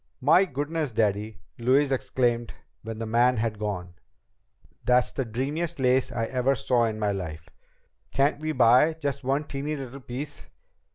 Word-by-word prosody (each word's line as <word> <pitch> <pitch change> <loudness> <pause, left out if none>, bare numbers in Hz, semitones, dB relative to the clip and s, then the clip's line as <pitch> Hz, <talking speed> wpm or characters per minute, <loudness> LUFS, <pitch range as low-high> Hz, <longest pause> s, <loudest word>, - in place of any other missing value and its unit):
"My 160 +8 +5
goodness, 145 -1 -3
Daddy!" 105 -1 -1 0.2
Louise 135 +4 +3
exclaimed 120 -3 0 0.3
when 110 0 -6
the 115 - -4
man 120 +2 +3
had 110 -1 -1
gone. 95 -5 -4 0.9
"That's 125 0 +3
the 135 - -2
dreamiest 145 +9 -2
lace 130 0 +2
I 115 -1 -1
ever 130 +3 +1
saw 120 -2 +2
in 110 -1 -2
my 105 -1 0
life. 80 -5 -6 0.6
Can't 140 +2 +1
we 155 +1 -2
buy 130 +3 +5
just 145 -4 -3
one 135 +3 0
teeny 145 +1 -4
little 135 -1 -7
piece? 140 +3 -7
125 Hz, 155 wpm, -26 LUFS, 115-140 Hz, 0.9 s, My